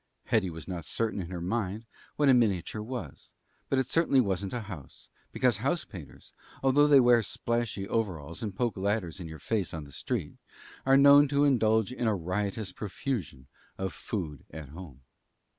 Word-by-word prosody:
Hetty 105 -5 +1
was 80 -3 -9
not 90 -3 -4
certain 110 +1 -1
in 85 - -7
her 90 -2 -5
mind 105 +3 -2 0.3
what 145 - +2
a 135 - +7
miniature 110 -3 +1
was; 125 +3 -7 0.4
but 135 - +2
it 130 - +2
certainly 140 0 +3
wasn't 100 -4 0
a 120 - -3
house; 90 -11 -10 0.2
because 125 -5 +2
house 140 - -1
painters, 90 -9 -12 0.3
although 140 +2 +5
they 145 -2 +7
wear 120 -2 +6
splashy 115 -3 -2
overalls 85 -9 -3
and 105 -4 -4
poke 120 -1 -1
ladders 100 -2 -1
in 85 - -6
your 80 0 -8
face 95 +2 -2
on 80 - -5
the 70 - -13
street, - - -4 0.5
are 135 0 +7
known 140 +1 +8
to 140 +1 +2
indulge 110 -5 +3
in 125 -2 -2
a 110 - +2
riotous 95 +3 -2
profusion 95 - -4 0.3
of 95 0 -3
food 80 - -5
at 75 -2 -9
home. 75 -5 -11
105 Hz, 175 wpm, -29 LUFS, 90-125 Hz, 0.5 s, known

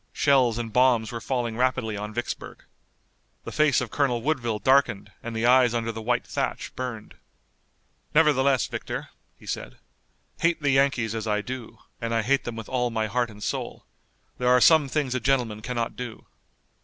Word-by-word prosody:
Shells 130 -5 +3
and 115 -2 -4
bombs 120 -3 +3
were 115 -1 -5
falling 120 -3 -2
rapidly 125 -4 0
on 105 +1 -5
Vicksburg. 120 +2 -5 0.8
The - - -7
face 150 -4 +3
of 125 - -5
Colonel 125 -5 0
Woodville 125 -7 0
darkened 105 -3 +2
and 115 -1 -6
the 110 +1 0
eyes 125 -1 +5
under 115 0 -1
the 110 0 -7
white 120 +2 0
thatch - - -3
burned. 120 -4 -6 1.0
"Nevertheless, 140 -5 +4
Victor," - - -5 0.3
he - - -17
said, - - -5 0.6
"hate 170 0 +2
the 145 -2 +1
Yankees 135 -5 +2
as 110 -1 -4
I 105 -1 +1
do, 120 -1 -7 0.2
and 115 0 -1
I 115 - +1
hate 135 +5 +1
them 120 - -4
with 115 -1 -7
all 125 -2 0
my 110 -1 -1
heart 120 +3 0
and 105 -1 -11
soul, - - -4 0.5
there 125 0 +2
are 125 0 +6
some 155 +2 +6
things 135 -2 -1
a 130 - 0
gentleman 125 -5 0
cannot 120 0 -3
do." 120 -3 -7
120 Hz, 180 wpm, -25 LUFS, 115-130 Hz, 1.0 s, are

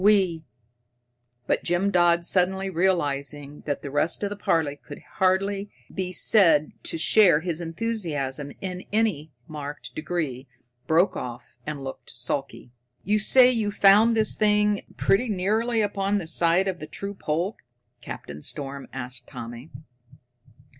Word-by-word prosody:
We 190 -6 +3 0.5
" 120 0 -47
But - - 0
Jim 175 +3 +1
Dodd, 175 -1 +3
suddenly 190 +1 +1
realizing 145 -5 -1
that 145 - -2
the 140 - -6
rest 155 +7 0
of 200 - -1
the - - -3
party 160 -7 0
could 145 0 -11 0.2
hardly 195 +2 +1 0.2
be 185 -1 -3
said 165 -5 +4
to - - -3
share 175 -2 +5
his 170 -1 -3
enthusiasm 165 -8 -3
in 185 -1 -5
any 205 -9 0 0.2
marked 150 -1 -7
degree, 155 -5 -4 0.4
broke 170 +4 +3
off 120 -1 -7
and 150 -3 -5
looked 135 - -8
sulky. 125 +1 -5 0.3
"You 210 +2 +1
say 250 +4 +7
you 225 -4 0
found 205 +3 +5
this 215 -1 +2
thing 210 -1 +2 0.2
pretty 230 +5 +2
nearly 220 +4 0
upon 200 -1 0
the 190 - -4
site 170 +3 +2
of 185 -2 -3
the 155 - -7
true 200 +6 -6
pole?" 175 +3 -2 0.5
Captain 75 +1 -8
Storm 140 - -5
asked 125 -1 -7
Tommy. 120 +5 -9
175 Hz, 140 wpm, -25 LUFS, 145-200 Hz, 0.5 s, say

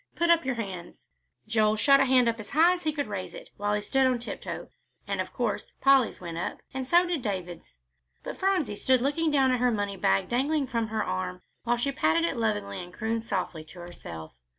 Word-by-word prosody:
Put 340 0 +3
up 335 -4 +4
your 265 -2 0
hands." 190 -6 -7 0.4
Joel's 215 -1 +2
hand 275 -1 +7
shot 255 -2 +5
up 230 0 0
as 215 - -8
high 330 +5 +5
as 360 - -5
he 310 - 0
could 290 -1 -2
raise 200 -3 -5
it, - - -11
while 205 +1 0
he 210 - -2
stood 270 +3 +2
on 255 -1 +2
tiptoe, 240 - -6 0.4
and - - -1
of - - -6
course - - -3
Polly's 270 -3 +4
went 170 -2 -6
up, - - -4
and 265 -1 -4
so 345 +4 +5
did 345 -5 -1
David's. 180 - -5 0.5
But - - -6
Phronsie 375 - +1
stood 260 +1 +3
looking 310 +5 +1
down 270 -3 +3
at 250 - +1
her 250 0 +3
money 205 -3 -2
bag 100 - +2
dangling 280 +4 +1
from 230 -3 -1
her 220 0 -1
arm, 95 - -3 0.2
while 240 0 +2
she 275 +4 0
patted 165 -10 +2
it 165 - -1
lovingly 205 -4 -2
and 175 - -11
crooned 225 +3 -2
softly 185 -6 -3
to 165 +3 -13
herself. 85 - -9
230 Hz, 220 wpm, -27 LUFS, 190-270 Hz, 0.5 s, hand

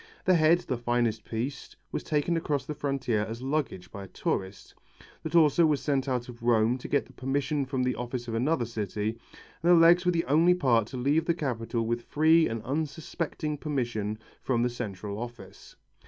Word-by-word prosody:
The 185 - +5
head, 165 +1 +4
the 130 -8 -3
finest 120 -2 0
piece, 125 +5 -5 0.2
was - - -2
taken 155 +3 0
across 145 -4 -1
the 150 - -4
frontier 135 -7 -1
as 115 +3 -5
luggage 135 -9 -2
by 100 -2 -7
a - - -12
tourist, 95 +1 -4 0.5
the 160 - -4
torso 160 0 +5
was 150 -2 +1
sent 140 -2 0
out 125 -2 -1
of 120 -1 -11
Rome 120 +1 +2
to - - -7
get 140 - +1
the - - -18
permission 140 +2 -1
from 130 -1 -1
the 125 0 +1
office 120 0 -5
of 115 - -4
another 125 +3 +1
city, 110 0 -3 0.4
and 170 +2 +4
the - - +8
legs 170 +2 +6
were 180 - +3
the 165 -1 0
only 165 +6 +4
part 120 -10 +2
to 130 - -7
leave 145 +6 +2
the 170 - +1
capital 115 -6 -2
with 120 +1 -1
free 160 +5 +4
and 115 -1 -4
unsuspecting 150 +1 -3
permission 120 -8 -2 0.2
from 120 -3 +1
the 125 - +1
Central 105 -3 -5
Office. 120 0 -9
130 Hz, 195 wpm, -28 LUFS, 115-155 Hz, 0.5 s, the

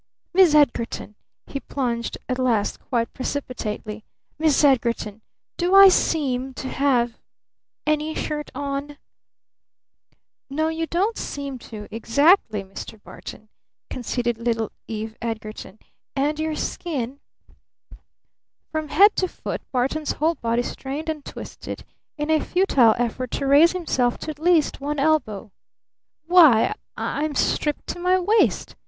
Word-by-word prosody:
"Miss 355 -4 +6
Edgarton!" 235 -7 +1 0.3
he 275 - -5
plunged 240 -4 -3
at 255 0 -2
last 235 -5 +1
quite 230 -3 -2
precipitately. 230 -6 -4 0.4
"Miss 310 -2 +3
Edgarton! 235 -6 +1 0.4
Do 360 +2 +2
I 390 0 +11
seem 265 -7 0
to 260 - -5
have 245 -4 +1 0.7
any 305 +1 0
shirt 300 -1 -3
on?" 285 +1 -4 1.5
"No, 315 +3 0
you 325 0 -2
don't 395 +8 0
seem 280 -2 -5
to, 210 -2 -8
exactly, 230 - +3
Mr. 195 +3 -9
Barton," 215 0 -11 0.4
conceded 240 -1 -2
little 230 -2 -1 0.2
Eve 220 0 -5
Edgarton. 220 -3 -6 0.4
"And 295 +3 0
your 315 0 -1
skin 280 -6 -3 0.7
" - - -25
From 310 -1 -2
head 400 +8 +5
to 370 - +2
foot - - -6
Barton's 275 +4 0
whole 320 +3 +1
body 235 -4 -1
strained 285 +6 -5
and 305 -2 -3
twisted - - -8 0.3
in 300 +1 -1
a 315 - +4
futile 280 - +4
effort 245 +1 -2
to 280 - -1
raise 290 +6 +6
himself 260 -9 0
to 310 - -4
at 295 - -12
least 330 -4 +2
one 295 +1 -2
elbow. 275 -9 0 0.7
"Why, 325 - +6 0.2
I'm 295 0 -2
stripped 295 +2 0
to - - -4
my 365 +1 +3
waist!" 425 +5 +2
280 Hz, 130 wpm, -23 LUFS, 235-315 Hz, 1.5 s, I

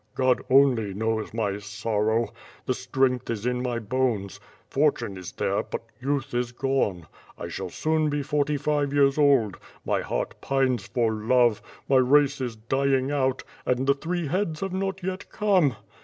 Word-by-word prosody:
God 130 -1 +2
only 125 -7 +4
knows 110 +1 -1
my 105 -3 -1
sorrow. 110 +2 -1 0.4
The 130 - +1
strength 125 0 0
is 115 -2 -3
in 125 0 0
my 125 -2 -1
bones. 115 -4 -1 0.3
Fortune 135 -8 +1
is 90 -2 -8
there, - - 0
but - - -6 0.2
youth 140 0 -2
is 120 0 -1
gone. 120 -9 -1 0.3
I - - -6
shall - - -5
soon 155 -1 0
be 145 -1 -1
forty 145 +1 0
five 145 -1 0
years 140 0 +3
old; 135 - +4 0.3
my - - +1
heart - - -3
pines 130 -6 0
for 115 +1 +1
love; 115 +1 +2 0.3
my 135 - +4
race 140 +2 +4
is 120 -3 -3
dying 135 +4 0
out, 130 -2 0 0.2
and 125 +1 0
the 140 - +5
three 170 +4 -3
heads 165 0 -1
have 195 -1 -3
not 190 0 -2
yet 185 +1 -4
come! 185 - +2
130 Hz, 165 wpm, -26 LUFS, 115-145 Hz, 0.4 s, the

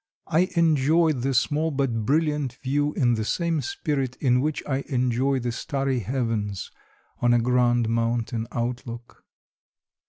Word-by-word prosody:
I 180 +4 +2
enjoyed 160 -2 +3
the 135 +2 0
small 150 +6 +1
but 130 -7 -1
brilliant 150 -3 +1
view 145 +2 +1
in 120 -3 +2
the 110 -1 -1
same 165 +7 0
spirit 145 - -2
in 125 -2 +2
which 155 +1 -2
I 135 - 0
enjoy 130 0 +1
the 120 -1 -2
starry 135 +1 -1
heavens 110 -4 -2 0.5
on 120 0 +4
a - - +4
grand 120 -1 +2
mountain 115 0 -1
outlook. 120 0 -5
130 Hz, 135 wpm, -25 LUFS, 120-145 Hz, 0.5 s, on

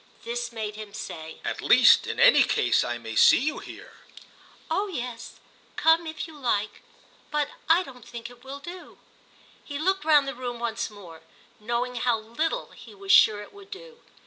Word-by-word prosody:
This 240 0 -4
made 215 -2 -5
him 210 -1 -9
say: 160 -4 -8
"At - - -3
least, - - +6
in - - -4
any - - +7
case, - - +2
I 120 - -3
may 115 -1 -8
see - - +7
you 300 +5 -2
here." - - -12 0.7
"Oh 390 +6 -1
yes, 250 - -6 0.4
come 325 +1 +3
if 315 +1 -5
you 320 - -13
like. 215 -5 -1 0.5
But 295 -1 -1 0.2
I 340 +3 +5
don't 250 -7 -13
think 235 0 -8
it 245 0 -16
will 270 +1 -7
do." 350 +5 -11 0.7
He 285 - -6
looked 380 +4 0
round 300 -3 +4
the 275 - -3
room 245 -1 -5
once 235 -1 -3
more, 180 -6 -13 0.4
knowing 240 +3 -2
how 240 -1 +1
little 270 - -3
he - - -14
was 395 -1 -3
sure 210 - +6
it - - -16
would 405 -1 -15
do. 470 +4 -11
250 Hz, 180 wpm, -26 LUFS, 225-320 Hz, 0.7 s, any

